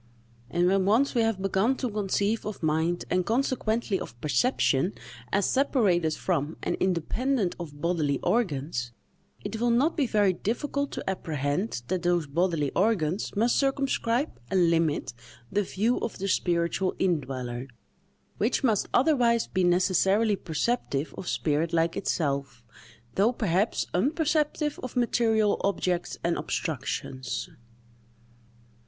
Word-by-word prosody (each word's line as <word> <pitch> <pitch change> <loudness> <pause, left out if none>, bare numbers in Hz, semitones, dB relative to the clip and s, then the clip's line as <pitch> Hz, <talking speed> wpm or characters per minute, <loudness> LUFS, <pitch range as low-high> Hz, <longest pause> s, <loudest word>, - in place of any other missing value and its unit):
And 175 +8 +1
when 190 +1 +3
once 230 +8 +3
we 240 - +2
have 225 -3 +1
begun 195 +6 +1
to 260 - -2
conceive 205 0 0
of 205 -4 -6
mind, 160 +3 0
and 180 0 +2
consequently 230 -2 0
of 120 - -8
perception, 155 - +1 0.4
as 200 0 +2
separated 195 - +2
from 160 -4 -1
and - - 0
independent 190 - 0
of 150 -4 -8
bodily 160 -5 +1
organs, 140 - -1 0.5
it 225 - -4
will 240 - +3
not 260 +8 +3
be 285 -6 +1
very 205 -4 +3
difficult 280 - -2
to - - -6
apprehend 150 - -2
that 185 -1 0
those 175 -2 +1
bodily 155 -1 0
organs 190 -3 0
must 230 +4 +2
circumscribe 275 -1 0
and 175 -3 +3
limit 160 -6 0 0.4
the 205 - +2
view 210 +5 0
of - - -4
the 195 - -3
spiritual 175 0 0
in 180 -4 +2
dweller, 130 -2 -5 0.7
which 225 +6 +1
must 220 -6 +2
otherwise 245 -5 +3
be 185 0 -1
necessarily 190 +4 +3
perceptive 160 - -2
of 180 - -7
spirit 155 +2 0
like 165 0 +2
itself, 140 -6 -2 0.5
though 210 +5 +3
perhaps 210 -3 0
unperceptive 300 - 0
of 255 - -7
material 225 -3 +2
objects 180 -2 -1
and 170 -2 0
obstructions. 130 -4 -3
190 Hz, 130 wpm, -27 LUFS, 165-230 Hz, 0.7 s, when